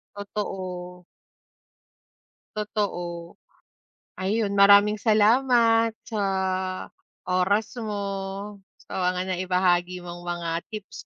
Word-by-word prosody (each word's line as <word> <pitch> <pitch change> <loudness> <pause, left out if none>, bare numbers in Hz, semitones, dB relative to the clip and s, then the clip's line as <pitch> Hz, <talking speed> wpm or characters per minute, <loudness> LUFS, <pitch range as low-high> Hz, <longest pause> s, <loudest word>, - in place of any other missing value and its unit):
Totoo. 185 -3 -5 1.5
Totoo. 175 -5 -3 0.8
Ayun, 200 +2 0
maraming 200 +1 +7
salamat 230 +1 +4
sa 215 -3 -4 1.1
oras 200 +6 +1
mo, 200 -2 -4 0.2
sa - - -7 0.2
mga 185 +1 -3
naibahagi 180 -1 +1
mong 175 0 -9
mga 175 -1 -3 0.2
tips 210 -2 -8
200 Hz, 75 wpm, -25 LUFS, 180-210 Hz, 1.5 s, maraming